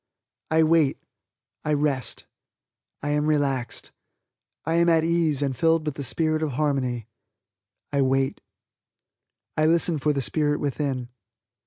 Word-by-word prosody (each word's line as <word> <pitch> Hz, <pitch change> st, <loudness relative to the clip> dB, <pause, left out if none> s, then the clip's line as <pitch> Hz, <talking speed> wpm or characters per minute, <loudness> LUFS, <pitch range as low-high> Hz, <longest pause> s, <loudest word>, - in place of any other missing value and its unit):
I 160 Hz, 0 st, +4 dB
wait 155 Hz, -3 st, +3 dB, 0.7 s
I 150 Hz, -, 0 dB
rest 145 Hz, -3 st, -1 dB, 0.8 s
I 145 Hz, -, -1 dB
am 150 Hz, +1 st, +1 dB
relaxed 140 Hz, -5 st, -1 dB, 0.7 s
I 165 Hz, -, 0 dB
am 170 Hz, 0 st, +4 dB
at 165 Hz, -1 st, +4 dB
ease 165 Hz, -4 st, +1 dB
and 135 Hz, -2 st, -1 dB
filled 165 Hz, +2 st, +2 dB
with 150 Hz, -, -2 dB
the 140 Hz, -, -7 dB
spirit 155 Hz, +4 st, +1 dB
of 155 Hz, -4 st, -1 dB
harmony. 130 Hz, -5 st, -1 dB, 0.9 s
I 140 Hz, -, +2 dB
wait. 135 Hz, 0 st, +1 dB, 1.1 s
I 155 Hz, 0 st, +3 dB
listen 165 Hz, -1 st, +2 dB
for 150 Hz, +2 st, +1 dB
the 140 Hz, -, -1 dB
spirit 145 Hz, +2 st, 0 dB
within. 135 Hz, -3 st, -2 dB
150 Hz, 135 wpm, -25 LUFS, 135-160 Hz, 1.1 s, I